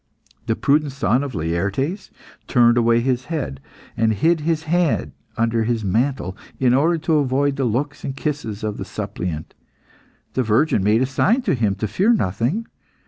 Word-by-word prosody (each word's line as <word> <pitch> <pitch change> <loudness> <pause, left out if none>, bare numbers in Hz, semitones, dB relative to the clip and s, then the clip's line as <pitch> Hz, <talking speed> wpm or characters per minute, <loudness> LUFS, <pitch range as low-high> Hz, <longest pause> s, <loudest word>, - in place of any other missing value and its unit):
The 110 - +1
prudent 145 +2 +1
son 130 -1 +1
of 135 -5 -5
Laertes 95 - -2 0.4
turned 120 -2 +4
away 115 0 +3
his 130 0 0
head, 145 - -4 0.4
and 110 -1 +2
hid 165 - +2
his 160 +1 -1
hand 170 -1 +1 0.3
under 115 0 +1
his 115 -1 -1
mantle, 110 -1 0 0.2
in 125 -2 +3
order 160 +6 +3
to 160 0 +1
avoid 140 0 +1
the 135 -2 -1
looks 130 +6 -2
and 135 0 -4
kisses 130 -8 -3
of 105 -1 -2
the - - -4
suppliant. 80 -3 -5 0.8
The 130 - +1
virgin 115 -1 +2
made 110 +5 +3
a - - +2
sign 220 - +1
to - - +1
him 110 -6 +1
to 110 +2 -3
fear 195 - +2
nothing. 125 - 0
130 Hz, 170 wpm, -21 LUFS, 110-150 Hz, 0.8 s, turned